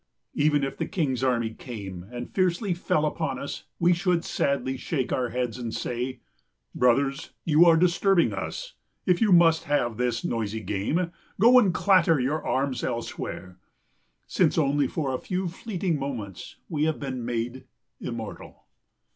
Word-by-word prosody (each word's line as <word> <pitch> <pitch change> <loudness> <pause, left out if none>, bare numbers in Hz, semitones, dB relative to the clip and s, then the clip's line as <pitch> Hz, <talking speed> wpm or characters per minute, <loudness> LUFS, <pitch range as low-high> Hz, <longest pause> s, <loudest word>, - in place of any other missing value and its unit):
Even 145 -1 +2
if 135 - -3
the - - -2
king's 135 -8 -1
army 120 -3 +1
came 100 -7 -7
and 120 0 -7
fiercely 185 +1 +1
fell 155 -3 0
upon 150 -3 -2
us 140 - -6
we 175 +1 +4
should 175 -1 0
sadly 140 -1 0
shake 130 0 -2
our 125 -2 0
heads 125 -1 -2
and 115 -2 -4
say, 125 +2 -3 0.5
Brothers, 135 +4 +1
you 160 +1 +6
are 165 -1 +6
disturbing 180 +1 +3
us. - - -5 0.3
If 180 +1 +2
you 215 -3 +4
must 165 -2 +5
have 120 -7 0
this 120 -2 -1
noisy 110 -1 -2
game, 110 - -1 0.3
go 240 +5 +8
and 205 -6 +3
clatter 175 -5 +4
your 140 +5 -1
arms 135 -1 -1
elsewhere. 95 -5 -5 0.7
Since - - +1
only 145 -2 +2
for 140 -3 -2
a 130 - -2
few 185 0 -2
fleeting 180 -3 -2
moments 115 -10 -6
we 155 -3 0
have 160 -1 0
been 130 -3 -4
made 120 +2 -3 0.3
immortal. - - -7
140 Hz, 155 wpm, -26 LUFS, 120-170 Hz, 0.7 s, go